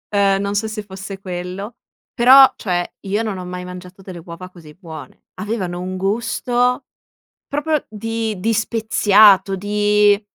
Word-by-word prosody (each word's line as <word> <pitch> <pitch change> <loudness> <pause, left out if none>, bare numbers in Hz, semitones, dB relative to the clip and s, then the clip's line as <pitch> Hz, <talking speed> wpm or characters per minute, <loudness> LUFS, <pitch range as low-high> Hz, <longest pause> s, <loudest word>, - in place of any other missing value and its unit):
ehm, 195 -1 +2
non 200 0 -3
so 220 +2 0
se 215 -1 -6
fosse 195 0 -9
quello, 185 +4 -6 0.4
però 265 +2 +7
cioè 175 -3 -2 0.2
io 205 +3 -1
non 210 -4 -4
ho 180 - -7
mai 180 0 -6
mangiato 180 +1 -11
delle 180 -3 -10
uova 180 +2 -9
così 165 -4 -15
buone. 160 -5 -11 0.2
Avevano 190 -5 -3
un 185 0 -5
gusto 245 +5 -1 0.6
proprio 295 +1 -1
di 225 0 -4
di 225 +4 0
speziato, 210 -3 +4
di, 205 +1 +2
200 Hz, 145 wpm, -19 LUFS, 185-220 Hz, 0.6 s, però